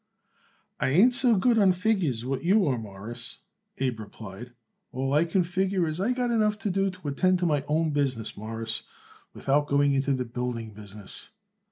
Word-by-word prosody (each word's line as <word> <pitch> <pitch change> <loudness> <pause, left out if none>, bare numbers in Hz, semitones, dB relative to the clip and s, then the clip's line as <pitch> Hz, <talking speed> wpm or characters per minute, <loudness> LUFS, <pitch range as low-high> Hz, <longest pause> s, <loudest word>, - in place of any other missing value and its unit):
"I - - +1
ain't 200 - +5
so 245 -2 +4
good 230 +4 +3
on 195 -3 +5
figures 180 - 0
what 135 0 -2
you 195 +3 +4
are, 130 -5 0
Mawruss," 110 +3 -8 0.4
Abe 130 -4 -1
replied. 110 +2 -9 0.4
"All 135 +2 -2
I 150 +3 +4
can 180 +2 +1
figure 185 0 0
is 155 +2 -3
I 205 +6 +1
got 250 -1 0
enough 215 -2 +2
to 205 - +2
do 195 +1 +1
to 185 -4 -9
attend 185 +6 +2
to 180 - -1
my 150 -4 +1
own 155 +1 +1
business, 135 -6 -1
Mawruss, 110 +1 -4 0.5
without 145 +2 +1
going 140 0 +3
into 135 0 +1
the 130 -1 -2
building 120 -2 -4
business." 105 -1 -3
145 Hz, 180 wpm, -27 LUFS, 120-190 Hz, 0.5 s, ain't